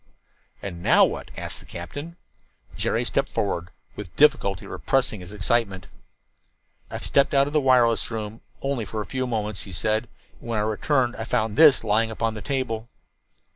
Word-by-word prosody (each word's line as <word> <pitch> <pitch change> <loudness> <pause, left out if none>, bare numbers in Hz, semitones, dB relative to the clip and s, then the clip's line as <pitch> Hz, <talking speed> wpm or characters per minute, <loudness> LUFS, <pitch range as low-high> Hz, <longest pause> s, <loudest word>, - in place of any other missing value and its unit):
"And 85 -4 -6
now - - +6
what?" - - -5
asked - - -2
the - - -16
captain. 145 - -7 0.6
Jerry - - 0
stepped - - 0
forward, 90 -3 -2 0.3
with 95 -5 -9
difficulty 140 -11 +3
repressing 130 -6 0
his 90 0 -10
excitement. 105 -3 0 1.0
"I - - -5
stepped 140 0 +2
out 135 0 +5
of 145 - -5
the 150 - +3
wireless 125 -4 +4
room 110 -1 -5 0.2
for - - -9
only 130 -6 -1
a 110 -2 -3
few 130 +7 -2
moments," 105 -4 -2
he 95 - -8
said. 110 +5 -1 0.3
"When 115 -2 -3
I 105 - +1
returned 120 +4 +1
I 110 - -3
found 110 -1 -1
this 155 -6 +7
lying 110 +1 +2
upon 110 0 -1
the 105 - -7
table." 125 -5 -2
110 Hz, 170 wpm, -24 LUFS, 105-130 Hz, 1.0 s, this